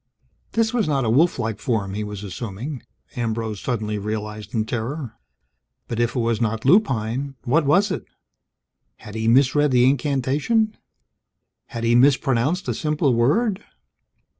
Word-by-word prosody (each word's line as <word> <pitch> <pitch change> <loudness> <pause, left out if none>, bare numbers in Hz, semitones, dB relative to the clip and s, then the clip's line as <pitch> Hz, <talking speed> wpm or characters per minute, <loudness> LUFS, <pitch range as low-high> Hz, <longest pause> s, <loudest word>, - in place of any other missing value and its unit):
This 225 0 +1
was 230 -7 +1
not 140 -4 +1
a 110 - +1
wolf 160 +8 +3
like 115 -4 -3
form, 105 -7 -1
he 105 +1 -3
was 105 -1 -6
assuming, 115 - -6 0.3
Ambrose 115 -3 -2
suddenly 105 -4 -2
realized 105 0 -5
in 110 -1 +1
terror. 120 +3 -4 0.7
But 115 - -4
if 120 +2 0
it - - 0
was 115 -1 0
not 110 0 -1
lupine, 135 - +2
what 150 +4 +2
was 195 +8 +3
it? - - -3 0.9
Had 105 - -12
he 110 0 -2
misread 140 +4 +4
the 125 -1 +4
incantation? 145 - +1 0.9
Had 115 - -6
he 115 0 +3
mispronounced 135 +5 +3
a - - 0
simple 150 -3 0
word? 195 - +1
120 Hz, 145 wpm, -22 LUFS, 110-145 Hz, 0.9 s, misread